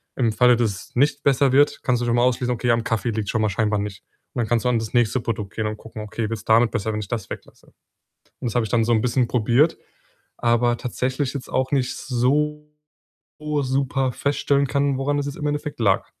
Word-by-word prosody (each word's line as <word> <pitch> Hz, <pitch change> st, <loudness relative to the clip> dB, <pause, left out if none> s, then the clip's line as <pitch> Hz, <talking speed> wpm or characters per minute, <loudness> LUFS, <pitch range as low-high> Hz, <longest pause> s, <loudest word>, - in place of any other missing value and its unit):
im 120 Hz, -4 st, +1 dB
Falle, 125 Hz, +3 st, +5 dB
dass 115 Hz, -2 st, +1 dB, 0.2 s
es -, -, -35 dB
nicht 140 Hz, +2 st, +2 dB
besser 135 Hz, -1 st, +3 dB
wird, 145 Hz, +2 st, +3 dB
kannst 125 Hz, -1 st, +1 dB
du -, -, -1 dB
schon 120 Hz, 0 st, +1 dB
mal 120 Hz, -, +3 dB
ausschließen: 125 Hz, 0 st, +1 dB
„Okay, 120 Hz, +1 st, 0 dB
am 115 Hz, -1 st, +1 dB
Kaffee 115 Hz, -2 st, -1 dB
liegt's 110 Hz, -2 st, -2 dB
schon 110 Hz, -, 0 dB
mal 110 Hz, -, +2 dB
scheinbar 105 Hz, +1 st, 0 dB
nicht.“ 100 Hz, -1 st, -5 dB, 0.3 s
Und -, -, -4 dB
dann 115 Hz, -, -1 dB
kannst 120 Hz, 0 st, +1 dB
du -, -, +3 dB
an 120 Hz, -2 st, +2 dB
das 110 Hz, -1 st, -6 dB
nächste 120 Hz, +1 st, +2 dB
Produkt 105 Hz, -3 st, -4 dB
gehen 110 Hz, -1 st, -1 dB
und 105 Hz, -, -4 dB
gucken: 110 Hz, 0 st, -9 dB
„Okay, 110 Hz, +1 st, -4 dB
wird's 115 Hz, -2 st, -5 dB
damit 115 Hz, +1 st, +4 dB
besser, 110 Hz, -1 st, -2 dB
wenn 105 Hz, -, -2 dB
ich 100 Hz, -, -7 dB
das 110 Hz, -5 st, -4 dB
weglasse?“ -, -, -10 dB, 0.7 s
Und -, -, -4 dB
das -, -, -8 dB
habe 120 Hz, -, +2 dB
ich 110 Hz, -, -6 dB
dann 115 Hz, -2 st, +2 dB
so 120 Hz, -, +1 dB
'n 110 Hz, -, +3 dB
bisschen 125 Hz, 0 st, +1 dB
probiert, 125 Hz, +7 st, +2 dB, 0.6 s
aber 120 Hz, 0 st, +2 dB
tatsächlich 130 Hz, +3 st, -2 dB
jetzt 140 Hz, -2 st, -6 dB
auch 130 Hz, +1 st, 0 dB
nicht 130 Hz, -3 st, 0 dB
so 150 Hz, +4 st, 0 dB, 0.7 s
super 135 Hz, -3 st, 0 dB
feststellen 140 Hz, +1 st, +1 dB
können, 140 Hz, 0 st, +1 dB
woran 145 Hz, +2 st, 0 dB
das 145 Hz, -, -1 dB
jetzt 145 Hz, -, -5 dB
im 150 Hz, -, -5 dB
Endeffekt 145 Hz, -2 st, -3 dB
lag. 100 Hz, -3 st, +2 dB
120 Hz, 235 wpm, -22 LUFS, 115-135 Hz, 0.7 s, Falle